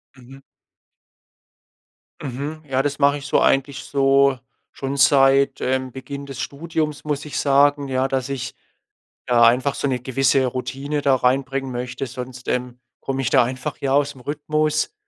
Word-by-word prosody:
Mhm. 135 +2 -15 1.8
Mhm. 145 +4 -5
Ja, 135 0 +1
das 145 0 -2
mache 140 +1 +4
ich 140 - -10
so - - +3
eigentlich 135 +1 +1
so 135 -1 +3 0.3
schon 135 +1 -4
seit, 135 0 +4
ähm, 130 0 -1
Beginn 140 +2 -7
des 135 -2 -8
Studiums, 150 0 -3
muss 150 -1 -3
ich 150 - -4
sagen, 140 0 +3
ja, 130 0 0
dass 135 0 -2
ich 130 -3 -4 0.8
ja 120 -1 +4
einfach 130 +4 +4
so - - -2
'ne 130 -2 -1
gewisse 130 +1 +2
Routine 135 +4 -3
da 140 -1 +4
reinbringen 135 +1 0
möchte, 125 +2 -4
sonst, 125 +1 -8
ähm, 125 0 -2 0.2
komme 135 0 -3
ich 120 - 0
da 130 -3 +5
einfach 130 +1 -4
ja 135 -1 -1
aus 145 0 +2
'm 130 - -15
Rhythmus. 155 - -1
135 Hz, 160 wpm, -21 LUFS, 130-140 Hz, 1.8 s, da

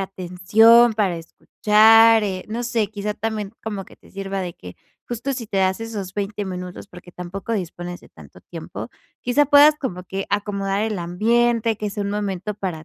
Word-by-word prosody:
atención 195 +6 +4
para 200 -5 0
escuchar, 220 +6 +4
eh, 190 -2 -3
no 235 +3 -3
sé, 230 -3 0
quizá 210 0 -4
también 215 -1 -4
como 205 -3 -5
que - - -18
te - - -22
sirva 195 0 -4
de 175 -2 -5
que, 90 0 -12 0.3
justo, 245 +3 -3
si 230 -4 -6
te 195 - -4
das 190 +2 +1
esos 205 -5 -6
20 205 0 -3
minutos 180 0 -7
porque 180 -1 -14
tampoco 180 +6 -6
dispones 175 -3 -4
de - - -18
tanto - - -16
tiempo, - - -8 0.3
quizá, 265 +4 +2
puedas 290 +1 +7
como 180 -9 -5
que 195 +2 -5
acomodar 200 0 -1
el 220 -2 -2
ambiente 225 +6 +1
que 210 0 -4
sea 200 0 -4
un 200 - -2
momento 205 0 -3
para 175 -6 -5
205 Hz, 180 wpm, -21 LUFS, 185-225 Hz, 0.3 s, puedas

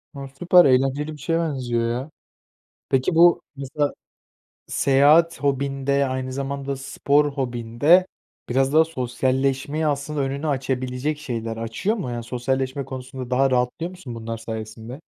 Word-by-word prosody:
A, 140 -1 -6
süper. 175 +6 +4
Eğlenceli 135 +3 +2
bir - - -10
şeye 165 +2 0
benziyor, 125 -7 -1
ya. 125 +5 -4 0.8
Peki, 135 +5 +1
bu 170 +1 +6 0.2
mesela 140 +2 -2 0.7
seyahat 145 +4 +4
hobin 140 -1 -1
de, 140 0 +2
aynı 130 0 -3
zamanda 140 +1 -3
spor 145 +2 +1
hobin 120 -4 -5
de, 175 +5 +6 0.4
biraz 135 +2 +1
daha 160 +1 +6
sosyalleşmeyi 135 +1 -1
aslında 145 0 -1
önünü 140 +3 -2
açabilecek 130 +1 -2
şeyler, 115 -6 -4
açıyor 115 - -2
mu? 175 - -4
Yani, 120 -1 -4
sosyalleşme 130 +3 -2
konusunda 130 -1 -7
daha 135 +2 +3
rahatlıyor 125 +7 0
musun 180 -10 -9
bunlar 115 0 -5
sayesinde? 110 +3 -7
135 Hz, 140 wpm, -23 LUFS, 125-145 Hz, 0.8 s, bu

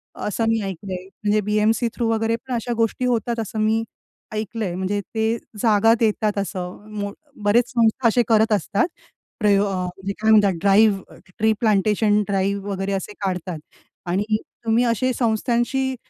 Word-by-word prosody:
असं 210 +2 -2
मी 225 0 +2
ऐकलंय, 190 -1 -5 0.2
म्हणजे 210 0 +2
बी-एम-सी 215 +3 +1
थ्रू 235 -2 0
वगैरे 225 0 +1
पण 250 +2 -7
अशा 240 0 -2
गोष्टी 230 +2 0
होतात 235 -1 0
असं 220 0 -4
मी 220 +1 +2 0.5
ऐकलंय. 215 -3 -3
म्हणजे 190 +2 -1 0.2
ते 220 +1 +1 0.2
जागा 225 0 +4
देतात 215 -2 +1
असं. 190 0 -4
मो 200 0 -3 0.3
बरेच 230 +4 +3
संस्था 235 +1 +2
असे 240 +2 +3
करत 220 0 +3
असतात, 205 - +1 0.5
प्रयो 205 -2 +3
अ, 200 - -2
म्हणजे 190 +2 -5
काय 220 - +2
म्हणतात 205 -3 +5
ड्राईव्ह, 200 0 +3 0.2
ट्री 220 +1 +4
प्लांटेशन 210 -1 +2
ड्राईव्ह 200 0 -1
वगैरे 195 0 -2
असे 195 +2 -4
काढतात 180 -3 -3 0.5
आणि 205 +4 +1 0.3
तुम्ही 225 +2 +3
अशा 235 +2 +1
संस्थांशी 240 +3 0
215 Hz, 155 wpm, -22 LUFS, 200-225 Hz, 0.5 s, म्हणतात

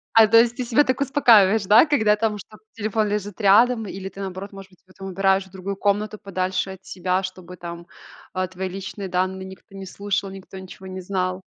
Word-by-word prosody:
А, 225 -1 +8
то 230 +2 +5
есть 235 0 +3
ты 255 - -3
себя 240 +4 +3
так 260 0 -1
успокаиваешь, 225 -7 +5
да? 215 +10 +7
Когда 220 -8 +3
там 210 -1 -1
что-то, 215 +1 -14
телефон 215 0 -1
лежит 205 0 -4
рядом, 225 +3 +4
или 190 0 -6
ты, 195 - -14
наоборот, 195 +1 -6
может 195 -1 -11
быть, 185 - -23
его 185 - -20
там 195 0 -8
убираешь 190 +1 +1
в 190 - -22
другую 195 +1 -5
комнату 205 +2 -1
подальше 190 0 -2
от 190 0 -12
себя, 185 +1 -1
чтобы 185 -1 -8
там, 170 0 -8 0.5
э, 185 0 0
твои 185 +1 -5
личные 195 +1 -6
данные 185 +1 -2
никто 190 +2 -13
не 195 -1 -8
слушал, 200 0 -3
никто 190 0 -10
ничего 190 0 -12
не 185 0 -6
знал. 185 0 -2
195 Hz, 215 wpm, -23 LUFS, 185-215 Hz, 0.5 s, А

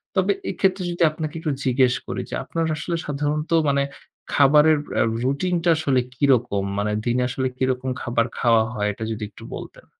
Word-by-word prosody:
তবে - - +3 0.2
এক্ষেত্রে 190 -1 +1
যদি 175 - 0
আপনাকে 155 0 -5
একটু 155 -1 -2
জিজ্ঞেস 130 -1 +3
করি - - -3
যে - - -4
আপনার 165 -1 -2
আসলে 170 +3 -3
সাধারণত 150 +3 -2 0.2
মানে 140 0 +2 0.5
খাবারের 150 +2 +6 0.2
আ - - +4 0.2
routine 145 +7 0
টা 175 - +3
আসলে 140 -5 +2 0.2
কিরকম? 125 -7 +2
মানে 105 +1 0
দিনে 125 +1 +1
আসলে 130 +1 -1
কিরকম 130 0 -1
খাবার 120 -1 +1
খাওয়া 115 -2 +4
হয় 105 -2 -1
এটা 110 - -7
যদি 110 -1 -4
একটু - - -14
বলতেন। - - -10
135 Hz, 175 wpm, -23 LUFS, 120-155 Hz, 0.5 s, খাবারের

